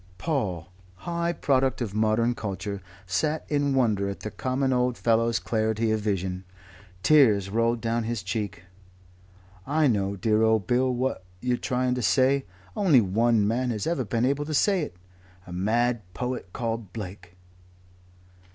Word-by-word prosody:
Paul, 95 - -2 0.3
high 170 - -2
product 135 -5 +1
of 115 -6 -3
modern 110 +2 +2
culture, 100 -2 -5 0.2
sat 95 - -1
in 145 -2 +1
wonder 105 -6 +2
at 100 - -6
the 110 - -5
common 130 +4 -1
old 125 -1 +1
fellow's 115 0 +2
clarity 110 0 0
of 110 - +1
vision. 95 -3 -2 0.6
Tears 105 -10 +5
rolled 115 +1 +1
down 115 0 -1
his 115 -4 -3
cheek. 100 -3 -4 1.0
"I 155 +2 +2
know, 100 -6 +1
dear 110 +2 +1
old 110 -3 +3
Bill, 125 +5 +2
what 125 -4 -2 0.2
you're 125 +2 0
trying 125 +1 0
to 125 - -2
say. 130 +4 +3 0.3
Only 180 -11 +5
one 110 +1 +2
man 125 +3 0
has 105 -4 -2
ever 165 -6 0
been 115 +2 0
able 140 +2 0
to 155 0 -2
say 195 +3 +3
it. 145 - -5 0.5
A 90 - -9
mad 115 +5 +1
poet 125 -7 -4
called 115 -3 -4
Blake. 90 -4 -8
115 Hz, 150 wpm, -26 LUFS, 100-130 Hz, 1.0 s, Tears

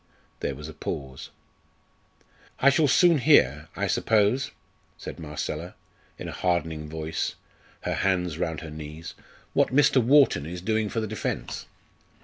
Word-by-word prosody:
There 70 - -2
was 75 +2 -8
a 80 - -8
pause. 65 -3 -6 1.3
"I 140 - +6
shall 150 +2 +3
soon 170 +3 +5
hear, 75 - +4
I - - -1
suppose," 110 +4 +2 0.5
said - - -8
Marcella, 75 +2 -5 0.4
in - - -6
a - - -5
hardening 80 -4 -1
voice, 80 0 -3 0.5
her - - -2
hands 90 -4 0
round 80 -3 -2
her 80 -1 -8
knees, 75 +2 -8 0.4
"what - - +4
Mr. 135 -2 +4
Wharton 130 - +4
is 90 +2 -5
doing 110 0 0
for 115 - -2
the 110 - -2
defence. 95 - -4
85 Hz, 140 wpm, -26 LUFS, 75-115 Hz, 1.3 s, I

